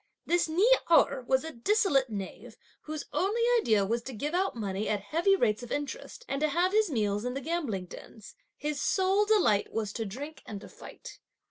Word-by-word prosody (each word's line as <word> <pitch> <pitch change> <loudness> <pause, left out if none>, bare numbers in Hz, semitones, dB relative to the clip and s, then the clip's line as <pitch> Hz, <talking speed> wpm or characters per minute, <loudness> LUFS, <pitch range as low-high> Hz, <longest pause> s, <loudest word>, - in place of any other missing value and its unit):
This 345 -1 +1
Ni 365 +8 +3 0.2
Erh 280 -5 +4
was 265 +1 +2
a 320 - -5
dissolute 275 - +2
knave, 200 -3 -7 0.3
whose 310 -1 -5
only 420 +5 +1 0.2
idea 215 - +2
was 230 +4 -1
to 260 +2 -8
give 290 +8 -4
out 375 -2 0
money 205 -2 -3
at 210 - +1
heavy 335 - +2
rates 215 - +1
of 245 - -9
interest 460 - -5
and 275 - -3
to 310 - +3
have 350 +5 +1
his 430 -1 +3
meals 210 -6 0
in 250 +1 -3
the - - -2
gambling 275 - -3
dens. 210 +4 -12 0.2
His 295 -1 -3
sole 385 +2 +2
delight 390 - +3
was 215 -2 -3
to 225 - -3
drink 285 +10 -8
and 205 - -6
to - - -11
fight. - - -12
280 Hz, 200 wpm, -29 LUFS, 220-360 Hz, 0.3 s, Erh